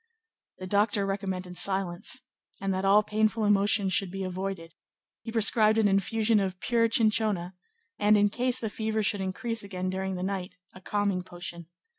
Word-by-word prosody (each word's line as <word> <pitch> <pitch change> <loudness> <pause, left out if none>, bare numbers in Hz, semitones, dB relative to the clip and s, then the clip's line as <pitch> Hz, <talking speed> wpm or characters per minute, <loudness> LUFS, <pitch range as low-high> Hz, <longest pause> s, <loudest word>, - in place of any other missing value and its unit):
The 185 - -7
doctor 205 +1 +1
recommended 190 -2 -4
silence, 190 +4 0 0.4
and 195 -1 -1
that 190 +1 -2
all 205 +2 +5
painful 215 +1 0
emotions 200 -1 +2
should 195 +1 +2
be 195 +1 -5
avoided; 185 -2 -5 0.5
he 225 - -7
prescribed 220 -1 +4
an 220 -2 +4
infusion 210 +3 +2
of 190 -2 -3
pure 230 +1 +1
chinchona, 215 -5 +1 0.5
and, 210 0 +4
in 205 0 +3
case 250 +3 +1
the 225 -3 -3
fever 220 0 -2
should 205 -1 +1
increase 225 +4 -2
again 185 -2 -4
during 190 0 -3
the 180 - -4
night, 190 -1 -4 0.2
a 185 - -13
calming 200 -2 -1
potion. 175 -2 -8
200 Hz, 165 wpm, -28 LUFS, 185-215 Hz, 0.5 s, all